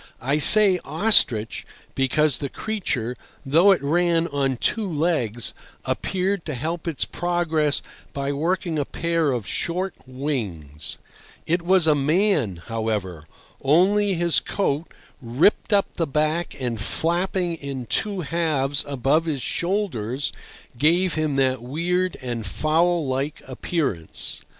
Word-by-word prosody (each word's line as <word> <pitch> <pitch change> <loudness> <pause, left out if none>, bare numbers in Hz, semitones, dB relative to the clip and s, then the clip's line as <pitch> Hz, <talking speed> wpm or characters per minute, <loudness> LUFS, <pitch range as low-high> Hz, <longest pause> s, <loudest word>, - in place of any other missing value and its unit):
I 140 +4 0
say 195 +3 +7
ostrich 120 - +3 0.3
because 135 +2 +2
the 140 - -3
creature, 130 - -3 0.3
though 165 +8 +5
it 190 - +2
ran 170 +2 +2
on 135 -3 -1
two 215 - 0
legs, 145 -8 -1 0.3
appeared 190 0 -1
to 155 - -4
help 160 +6 -4
its 160 -4 -1
progress 165 -4 0 0.3
by 140 0 -2
working 165 +2 -1
a 145 - 0
pair 165 -2 0
of 120 -5 -2
short 180 - -2
wings; 105 - -4 0.5
it 170 +2 +1
was 180 0 +3
a 155 - +5
man, 145 - +1
however, 105 -8 -3 0.3
only 190 +7 +3
his 170 -1 +2
coat, 160 -5 -2 0.3
ripped 130 - +2
up 200 -1 +4
the 165 - -1
back 155 +3 -1
and 120 -4 -3
flapping 175 - 0
in 135 -4 -6
two 195 - -1
halves 150 -3 0
above 140 +4 +1
his 145 -6 -2
shoulders, 145 - -2 0.5
gave 170 +5 +3
him 155 -3 -1
that 130 -2 +1
weird 175 +8 -1
and 120 -4 -4
fowl 165 - +1
like 135 +3 -2
appearance. 130 - -3
155 Hz, 125 wpm, -23 LUFS, 130-175 Hz, 0.5 s, say